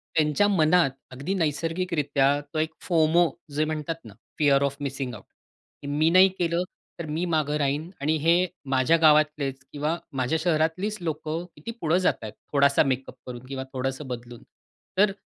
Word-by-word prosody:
त्यांच्या 155 +6 +3
मनात 170 -5 +4 0.2
अगदी 140 +9 -3
नैसर्गिकरित्या 155 -4 0
तो 155 - -1
एक 155 0 -1
फोमो 165 0 +3 0.3
जे 155 +1 +2
म्हणतात 155 +1 -3
ना, 110 - -11 0.3
फीअर 140 -2 +4
ऑफ 140 0 0
मिसिंग 135 -2 -3
आउट. 105 - -13 0.6
की - - -8
मी 150 +3 +2
नाही 185 +3 +7
केलं, 170 0 +1 0.4
तर 170 - -4
मी 160 +3 -2
मागं 155 -3 0
राहीन 145 +3 -1
आणि 155 +3 +2
हे 170 +3 +4 0.2
माझ्या 130 +5 +3
गावातलेच 150 -3 +3
किंवा 150 +3 -1 0.2
माझ्या 130 +4 +1
शहरातलीच 170 +5 0
लोकं 160 0 -3
किती 230 - -7
पुढं 165 +2 +2
जातायत, 110 - -1 0.2
थोडासा 140 0 +5
मेकअप 135 -2 -2
करून 125 0 -8
किंवा 130 0 -5
थोडंसं 135 +2 -3
बदलून. 120 -1 -7 0.5
तर 200 +1 +5
155 Hz, 155 wpm, -26 LUFS, 140-165 Hz, 0.6 s, नाही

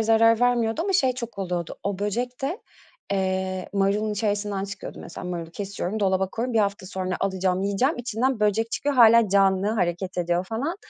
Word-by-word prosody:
zarar 225 +1 +4
vermiyordu 240 +1 +2
ama 390 +2 -1
şey 265 -9 +3
çok 235 -4 -7
oluyordu, 175 -3 -3
o 200 -1 -2
böcek 240 +5 -2
de, 335 - -3 0.5
eee, 190 -1 -1
marulun 200 +2 +1
içerisinden 205 -1 -1
çıkıyordu 200 - -8
mesela - - -8
marulu 170 -2 -5
kesiyorum, 200 +2 -4
dolaba 190 -1 +1
koyuyorum, 235 +3 -3
1 - - +4
hafta 200 -2 0
sonra 185 -1 -3
alacağım, 190 -1 0
yiyeceğim, 200 +10 +1
içinden 245 +1 -1
böcek 215 +2 +1
çıkıyor, 290 0 -1
hâlâ 230 -3 +7
canlı 195 0 +3
hareket 185 -3 -1
ediyor 175 +1 0
falan. 250 - -3
205 Hz, 170 wpm, -25 LUFS, 190-230 Hz, 0.5 s, hâlâ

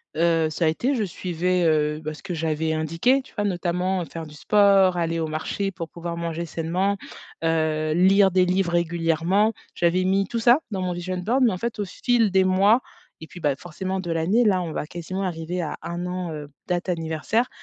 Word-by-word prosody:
heu, 165 -1 +2
ça 165 +1 0
a - - +4
été. 240 - +1
Je 225 -5 0
suivais, 180 -1 -1
heu, 150 -1 +2
bah, 155 - -4
ce 155 - -12
que 185 -3 -5
j'avais 160 0 -1
indiqué, 165 - +1
tu - - -19
vois? 205 - -2
Notamment 180 -1 -1
faire 165 -1 -7
du 150 - -13
sport, 195 +1 +4
aller 165 -1 0
au 160 - 0
marché 175 +6 -3
pour 165 -2 -7
pouvoir 170 0 -6
manger 170 0 -3
sainement, 175 +5 -1 0.5
heu, 155 -1 +1
lire 195 +3 +5
des 185 0 +3
livres 180 -1 +1
régulièrement. 170 +5 +1 0.2
J'avais 175 +2 +1
mis 195 +1 +1
tout 235 - -2
ça 240 +5 +5
dans 195 -4 -3
mon 180 -1 -1
vision 180 +1 -4
boards, 230 +9 0
mais 245 -3 +5
en 185 - -3
fait, 230 +3 -4
au 205 - -1
fil 230 +3 +1
des 190 0 +4
mois 200 +6 +4 0.4
et 160 - -9
puis, 175 - -11
bah, 145 -4 +1
forcément 185 +5 -4
de 175 -2 -5
l'année, 180 +9 +2
là, 190 -4 +3
on 165 - -5
va 150 - -4
quasiment 175 +3 -5
arriver 175 -1 -3
à 155 - -4
1 175 +1 -4
an, 180 -2 -4
heu, 150 -1 -7 0.2
date 180 0 -1
anniversaire, 165 +8 -1
175 Hz, 210 wpm, -24 LUFS, 165-195 Hz, 0.5 s, lire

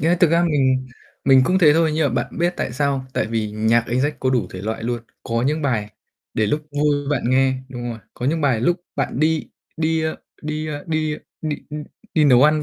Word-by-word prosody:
Nghĩa 160 - +2
là 175 - +5
thực 175 - +5
ra 170 +1 +4
mình 130 -5 +2 0.4
mình 135 -1 +6
cũng 185 +7 +2
thế 155 -5 +7
thôi, 160 -2 +3
nhưng 155 -2 +2
mà 120 - +2
bạn - - -9
biết 175 +1 +1
tại - - -2
sao 140 +1 +1
không? 130 - -8
Tại - - +1
vì 110 -2 -2
nhạc 110 +2 +2
anh 120 +2 0
Jack 145 +3 +1
có 130 - +1
đủ 120 -8 +1
thể 95 - -7
loại 110 +1 -3
luôn, 120 0 -2 0.2
có 115 0 -1
những 155 +1 0
bài 110 -7 0 0.4
để 110 - +2
lúc 150 +8 0
vui 145 0 +2
bạn 145 - +1
nghe 130 0 +3
đúng 120 -1 -5
rồi, 115 - -6 0.2
có 125 - -3
những 160 +3 +1
bài 130 -6 +2
lúc 175 +8 +2 0.2
bạn 135 - -1
đi 160 0 +1 0.3
đi, 160 0 +1
a, 160 - +1 0.3
đi, 155 +1 -3
a, 145 -1 -4
đi, 155 -2 0
a, - - -12 0.2
đi, 155 -2 -1
ưm, 150 0 -5 0.3
đi 155 -3 +4
nấu 130 -2 +6
ăn 150 0 +4
145 Hz, 250 wpm, -21 LUFS, 120-155 Hz, 0.4 s, thế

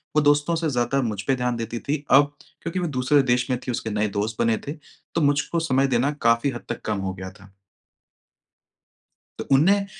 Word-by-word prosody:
वो 150 - +5
दोस्तों 145 +3 +3
से 165 -1 -1
ज़्यादा 130 +1 0
मुझ 105 -4 -2
पे 135 - +1
ध्यान 125 -1 -1
देती 115 0 -4
थी, 145 +3 -3
अब 145 +1 +5 0.3
क्योंकि 170 +2 -3
वो 175 - -1
दूसरे 140 0 +2
देश 125 +1 +1
में 125 - 0
थी, - - 0
उसके 115 -1 -3
नए 105 +1 0
दोस्त 105 +2 -2
बने 115 -1 +2
थे, - - -2 0.4
तो 165 - +2
मुझको 145 +3 +1
समय 135 -4 +2
देना 130 +2 +1
काफ़ी 115 +3 +3
हद 120 - -8
तक 120 - -4
कम 105 -1 -1
हो 95 -1 -3
गया 95 0 -7
था। 100 -1 -18 1.9
तो - - -5
उन्नें 195 +8 +4
130 Hz, 205 wpm, -24 LUFS, 115-145 Hz, 1.9 s, वो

